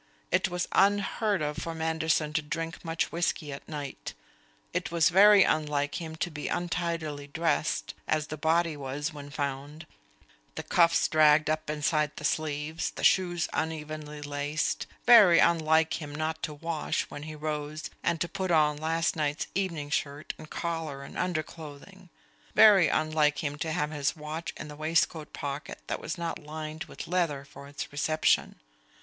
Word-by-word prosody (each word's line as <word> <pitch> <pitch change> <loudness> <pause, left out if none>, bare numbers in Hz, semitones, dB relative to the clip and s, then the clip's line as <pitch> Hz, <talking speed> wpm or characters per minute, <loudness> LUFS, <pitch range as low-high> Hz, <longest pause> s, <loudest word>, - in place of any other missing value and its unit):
It - - +2
was 180 0 -2
unheard 200 -1 +2
of 150 0 -2
for 165 -1 -4
Manderson 160 -1 0
to 155 - +1
drink 165 +2 -5
much 165 -1 -1
whisky 170 -3 -1
at 140 - -10
night. 145 -3 -6 0.6
It - - -1
was 165 -1 +3
very 200 +2 +7
unlike 150 0 0
him 160 -1 -6
to 170 +2 -3
be 150 -1 -5
untidily 170 -4 -2
dressed, 145 - -1
as 155 -1 +1
the 155 - -6
body 160 +1 +1
was 145 +3 -4
when 145 -1 -9
found 145 +2 -4 0.7
the - - -4
cuffs 170 -1 +4
dragged 155 0 +5
up 155 -1 -2
inside 150 0 0
the - - -9
sleeves, 155 0 -1
the - - -8
shoes 175 -2 +3
unevenly 155 -2 -4
laced; 145 +1 -2 0.2
very 215 -8 +8
unlike 160 -1 +3
him 145 -1 -7
not 160 +1 -2
to 155 - -3
wash, 165 0 -2
when 145 - -7
he 155 +1 -7
rose, 150 0 -4
and 165 - 0
to 170 - +1
put 190 +1 -3
on 150 -3 +3
last 165 +2 0
night's 150 -1 -1
evening 165 -7 -2
shirt 145 +1 -2
and 155 - -11
collar 160 -5 -4
and - - -11
underclothing; 170 +1 -5 0.5
very 200 -6 +8
unlike 155 -1 +1
him 145 -1 -2
to 160 0 -2
have 155 -2 -1
his 145 -2 -1
watch 155 +2 -5
in - - -7
the 150 - -9
waistcoat 155 0 0
pocket 140 +1 -5
that - - -3
was - - -4
not 170 0 -3
lined 155 +2 -6
with - - -9
leather 165 -6 0
for 140 0 -12
its 145 0 -6
reception. 155 +2 +1
155 Hz, 165 wpm, -28 LUFS, 150-165 Hz, 0.7 s, very